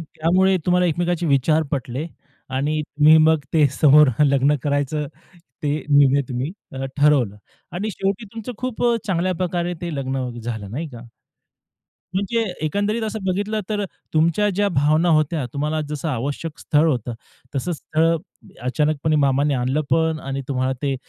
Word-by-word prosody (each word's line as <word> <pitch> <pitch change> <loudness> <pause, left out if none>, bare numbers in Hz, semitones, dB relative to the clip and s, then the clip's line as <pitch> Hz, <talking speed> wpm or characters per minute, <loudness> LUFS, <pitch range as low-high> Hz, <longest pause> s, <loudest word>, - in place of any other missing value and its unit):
त्यामुळे 175 +5 +2
तुम्हाला 180 0 +3
एकमेकांचे 175 +1 0
विचार 155 +2 +3
पटले 135 +1 -3 0.5
आणि 150 +3 0
तुम्ही 150 +1 +5
मग 160 0 +4
ते 155 -3 +5
समोर 150 0 +7 0.2
लग्न 140 +1 +3
करायचं 145 +1 -1 0.6
ते 145 0 0
निर्णय 140 -1 +5
तुम्ही 130 +4 -3 0.2
अ, 135 0 -4
ठरवलं 140 -8 +3 0.4
आणि 200 +6 -3
शेवटी 195 +2 -2
तुमचं 225 +2 -6
खूप 255 -2 -4
अ, 240 -1 +3
चांगल्या 185 -1 0
प्रकारे 175 0 -2
ते 170 -2 -4
लग्न 130 -2 -2
झालं 110 -4 -5
नाही 155 +8 -4
का? 120 -4 -10 1.1
म्हणजे 200 +4 0 0.2
एकंदरीत 205 +7 -1
असं 220 0 -3
बघितलं 205 +3 -1
तर 210 -2 -1 0.3
तुमच्या 170 +6 +3
ज्या 200 +2 +1
भावना 155 +1 +2
होत्या. 155 -2 +2
तुम्हाला 150 +2 -1
जसं 150 +1 -3
आवश्यक 145 +4 -3
स्थळ 150 +2 +2
होतं. 120 -3 -2 0.4
तसंच 170 +5 -2
स्थळ 155 +2 0
अ, - - +1 0.5
अचानकपणे 150 +3 +1
मामांनी 140 0 +2
आणलं 130 +3 0
पण 160 -1 +2
आणि 135 0 -3
तुम्हाला 130 -1 0
ते 140 -2 0
155 Hz, 150 wpm, -21 LUFS, 140-175 Hz, 1.1 s, समोर